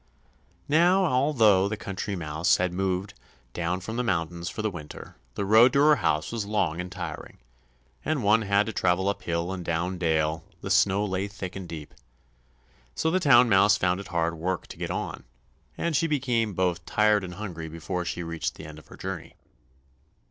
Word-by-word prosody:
Now, 175 +6 +4
although 125 - +3
the 110 - -3
Country 100 0 -4
Mouse 80 -1 +1
had 90 -1 -1
moved 95 +1 -2 0.4
down 90 +2 -2
from 110 +5 -5
the 125 - 0
mountains 85 -4 -2
for 110 - -5
the 110 - 0
winter, 75 -5 -10 0.2
the 100 - -2
road 115 +5 +6
to 140 - +3
her 150 0 +6
house 75 +1 0
was 115 -2 -2
long 100 -5 -1
and 90 0 -8
tiring, - - -7 0.7
and 155 -6 -1
one 105 +2 +4
had 100 0 +2
to 110 - -4
travel 90 +1 +1
up 100 - -3
hill 85 +1 -2
and 90 -2 -5
down 85 +2 -2
dale; 80 -1 0 0.2
the - - -4
snow 100 +1 +3
lay 95 0 -2
thick 100 -2 -7
and 95 -3 -7
deep, 75 -3 -8 1.0
so 160 - 0
the 185 - +2
Town 130 -7 +6
Mouse 100 -1 +5
found 90 0 +1
it 100 - -8
hard 85 -1 0
work 90 +3 -3
to - - -9
get - - -4
on, - - -4 0.5
and 170 -2 -1
she 165 - +2
became 120 - 0
both 90 -2 0
tired 105 -1 +3
and 90 -1 -7
hungry 85 -5 -6
before 90 +3 -4
she 85 0 -4
reached 85 -1 -3
the 75 - -10
end 75 0 -10
of - - -19
her - - -13
journey. - - -6
95 Hz, 190 wpm, -26 LUFS, 85-110 Hz, 1.0 s, road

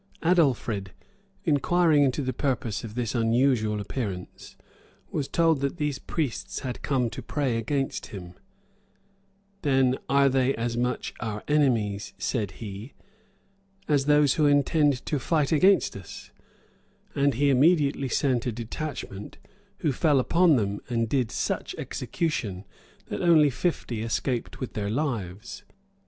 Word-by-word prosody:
Adelfrid, 125 - +1 0.5
inquiring 160 0 +3
into 140 +1 +1
the 130 0 -2
purpose 125 -6 -2
of 110 -1 -8
this 120 -3 -2
unusual 115 -2 +2
appearance, 100 -4 -6 0.6
was 140 -3 -2
told 165 -3 +2
that 140 +4 -1
these 150 -3 -2
priests 150 -8 -3
had 125 -2 -5
come 130 -4 +1
to - - -6
pray 135 -5 -1
against 135 +5 -2
him: 90 -4 -9 1.3
"Then 135 -3 +2
are 140 0 +5
they 135 0 +2
as 115 0 -2
much 125 +1 -2
our 105 -3 -4
enemies," 115 -10 +1
said 105 -7 -2
he, 105 +3 -8 0.9
"as 145 -3 +2
those 150 -2 +4
who 150 - +3
intend 145 -1 +2
to 150 - -1
fight 150 +2 +1
against 185 +6 +4
us;"[*] 95 -3 -10 0.8
and 140 -2 +2
he 140 +3 +3
immediately 140 -1 +3
sent 125 -2 +1
a - - 0
detachment, 115 -2 -6 0.4
who 155 - +2
fell 145 +1 +3
upon 170 +4 +4
them, 100 -4 -1
and 115 -2 0
did 125 -2 0
such - - -2
execution, 105 - -3 0.4
that - - -3
only 160 -5 +5
fifty 125 -6 -2
escaped 115 +2 -2
with 130 - -5
their 100 -1 -2
lives. 115 - -3
130 Hz, 135 wpm, -26 LUFS, 115-145 Hz, 1.3 s, are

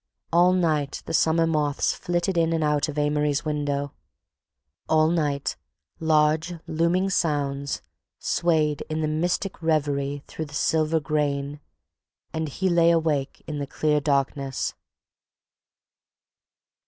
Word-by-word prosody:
All 175 +2 +6
night 155 -6 0
the - - -5
summer 165 +1 +3
moths 150 -3 +1
flitted 175 +1 -1
in 165 -1 +2
and 160 -1 0
out 150 0 +1
of 150 - -6
Amory's 150 0 +1
window; 145 -2 -2 1.0
all 155 0 +4
night 145 -4 0 0.4
large 160 +2 +2
looming 170 +4 +1
sounds 140 -5 -1 0.3
swayed 155 -4 +1
in 155 0 -1
mystic 180 +2 -1
revery 145 -3 0
through 160 - -6
the 150 0 -10
silver 160 +1 +2
grain—and 145 +2 -4
he 190 +7 -1
lay 170 -2 +4
awake 155 -5 0
in 150 -1 -4
the 140 - -3
clear 150 +1 +1
darkness. 140 -1 -1
155 Hz, 115 wpm, -25 LUFS, 145-165 Hz, 1.0 s, All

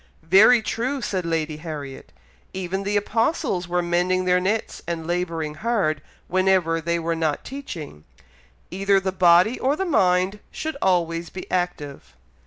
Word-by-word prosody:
"Very 215 +8 +6
true!" 255 +6 -2
said 185 -8 -3
Lady 160 -2 -1
Harriet. 145 - -8 0.4
"Even 190 +1 -3
the 205 +1 0
apostles 205 - 0
were 175 0 0
mending 180 +2 +1
their 180 0 +3
nets 205 +5 -2
and 165 -2 -3
labouring 165 -3 -2
hard, 175 -6 0 0.3
whenever 185 -3 +2
they 170 +1 0
were 165 0 -1
not 160 -3 -1
teaching. 170 - -8 0.7
Either 195 +2 +2
the 190 0 -2
body 180 +5 +4
or 270 +3 +1
the 385 - -2
mind 185 - +2
should 315 -1 -4
always 170 -2 +1
be 185 - -8
active." 145 - -3
180 Hz, 145 wpm, -23 LUFS, 165-195 Hz, 0.7 s, Very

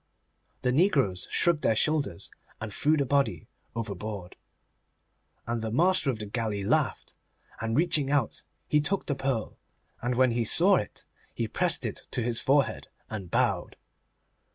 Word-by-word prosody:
The 125 - +2
negroes 135 - +2
shrugged 170 -4 +2
their 110 - +2
shoulders, 145 - -1 0.3
and 110 -1 -6
threw 155 +7 +2
the 140 - +1
body 135 - +1 0.3
overboard. 105 -4 -5 1.1
And 115 -1 -2
the 110 - -3
master 165 +4 +3
of 125 - -1
the 105 - -6
galley 105 -2 -2
laughed, - - 0 0.5
and, 115 +1 -1
reaching 155 -4 +2
out, 140 -5 0 0.3
he 150 - +3
took 190 +6 -1
the 140 - -1
pearl, 135 -5 -3 0.4
and 125 +1 -1
when 130 0 +4
he 115 0 0
saw 185 - +6
it 105 - -5 0.3
he - - -1
pressed - - 0
it - - -5
to 120 - -2
his 115 0 0
forehead 140 +1 +1 0.2
and 100 -5 -5
bowed. - - 0
125 Hz, 155 wpm, -28 LUFS, 110-145 Hz, 1.1 s, saw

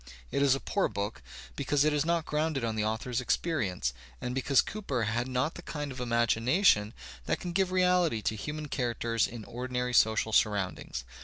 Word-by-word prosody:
It - - 0
is 140 -2 +5
a - - -3
poor 200 - 0
book, 100 - -4 0.3
because 145 - +1
it 155 - +3
is 145 -1 +2
not 170 0 0
grounded 150 -3 -1
on 110 -1 -2
the 110 - 0
author's 115 +3 -1
experience, 110 - 0 0.3
and 125 - -3
because 135 +1 +2
Cooper 140 - -3
had 115 +3 -1
not 130 +5 0
the - - -9
kind 145 -4 -5
of 130 - -8
imagination 115 - +3 0.3
that - - 0
can 175 - -5
give 185 +1 +1
reality 180 - +2
to 110 - 0
human 150 +7 -5
characters 115 -3 0
in 115 -3 -8
ordinary 125 0 -3
social 110 -1 +3
sur 105 - +5
roundings. 95 -10 -4
125 Hz, 185 wpm, -30 LUFS, 110-150 Hz, 0.3 s, is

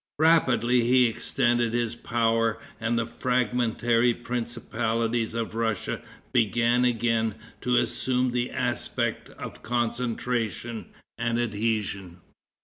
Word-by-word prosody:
Rapidly 130 -7 +4
he 125 +1 +5
extended 120 0 +1
his 120 -1 0
power, 115 -1 +1 0.2
and 115 +1 0
the 115 - +1
fragmentary 120 0 +1
principalities 115 -1 -2
of 115 -2 -2
Russia 115 -3 -1 0.3
began 120 +1 +3
again 115 -2 +1 0.3
to 125 0 +2
assume 125 -1 +1
the 125 0 -1
aspect 125 -2 -2
of - - -9
concentration 120 -2 -2 0.3
and 115 0 0
adhesion. 105 -5 -2
120 Hz, 100 wpm, -26 LUFS, 115-120 Hz, 0.3 s, he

